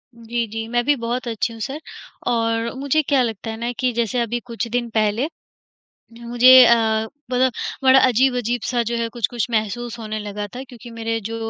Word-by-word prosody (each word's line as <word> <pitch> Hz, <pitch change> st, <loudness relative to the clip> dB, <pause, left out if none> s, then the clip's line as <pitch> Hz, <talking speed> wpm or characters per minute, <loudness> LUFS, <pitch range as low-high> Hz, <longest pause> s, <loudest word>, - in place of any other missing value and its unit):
जी, 235 Hz, 0 st, -3 dB
जी। 225 Hz, +1 st, -5 dB
मैं 240 Hz, +1 st, 0 dB
भी 290 Hz, +1 st, +3 dB
बहुत 240 Hz, 0 st, -3 dB
अच्छी 230 Hz, 0 st, -2 dB
हूँ 225 Hz, -, -11 dB
सर 275 Hz, +6 st, -4 dB, 0.5 s
और 230 Hz, -1 st, 0 dB
मुझे 280 Hz, +3 st, +2 dB
क्या 275 Hz, -3 st, +2 dB
लगता 225 Hz, -2 st, -3 dB
है 220 Hz, -, -6 dB
ना 235 Hz, +1 st, -2 dB
कि 255 Hz, -1 st, +1 dB
जैसे 235 Hz, +1 st, -1 dB
अभी 235 Hz, +1 st, -1 dB
कुछ 235 Hz, -2 st, -4 dB
दिन 240 Hz, 0 st, -2 dB
पहले, 220 Hz, +4 st, +1 dB, 0.9 s
मुझे 245 Hz, +2 st, +7 dB
अ, 235 Hz, -, +7 dB, 0.6 s
ब 255 Hz, +1 st, +2 dB, 0.3 s
बड़ा 265 Hz, 0 st, +7 dB
अजीब-अजीब 245 Hz, -1 st, +1 dB
सा 245 Hz, -2 st, 0 dB
जो 235 Hz, -, -2 dB
है 230 Hz, 0 st, -1 dB
कुछ-कुछ 235 Hz, 0 st, -2 dB
महसूस 235 Hz, +2 st, -2 dB
होने 215 Hz, -1 st, -4 dB
लगा 205 Hz, 0 st, -5 dB
था। 255 Hz, -, -6 dB
क्योंकि 245 Hz, -1 st, -12 dB
मेरे 225 Hz, 0 st, -3 dB
जो 225 Hz, -, -5 dB
235 Hz, 190 wpm, -21 LUFS, 225-250 Hz, 0.9 s, मुझे